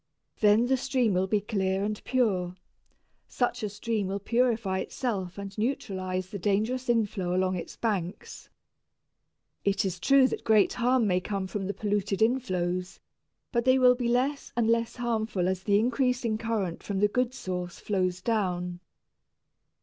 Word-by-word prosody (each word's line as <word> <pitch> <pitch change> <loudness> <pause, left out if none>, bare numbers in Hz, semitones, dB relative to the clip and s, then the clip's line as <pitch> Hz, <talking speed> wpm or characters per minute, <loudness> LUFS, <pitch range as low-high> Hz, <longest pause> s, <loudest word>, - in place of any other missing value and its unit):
Then 210 +2 +5
the 265 +1 +2
stream 255 -5 +1
will 185 +1 +1
be 205 +1 +1
clear 195 -2 -1
and 210 0 -3
pure. 195 -9 0 0.7
Such 245 0 -1
a 210 - -2
stream 210 0 -2
will 195 +1 -2
purify 220 -3 +1
itself 195 -9 -3
and 200 -1 -7
neutralize 185 -6 -2
the 200 - -5
dangerous 220 +7 0
inflow 205 -6 +1
along 185 0 +1
its 170 - -6
banks. 195 -6 -4 1.1
It 200 0 +1
is 185 -2 -3
true 275 +5 +5
that - - -4
great 215 -2 +4
harm 250 0 +2
may 180 -3 +2
come 195 0 -3
from 190 0 -4
the 200 - -2
polluted 205 -1 -1
inflows, 185 -7 0 0.5
but 235 -2 +1
they 260 +1 +5
will 250 -1 +6
be 245 -1 -2
less 265 +4 0
and 235 -2 +2
less 230 0 +1
harmful 220 -6 -1
as 185 0 -1
the 200 +1 +3
increasing 245 0 +1
current 215 -7 -2
from 200 - -4
the 210 - +4
good 250 +3 0
source 180 -5 -4
flows 185 -3 -1
down. 180 -6 -1
210 Hz, 155 wpm, -28 LUFS, 190-235 Hz, 1.1 s, will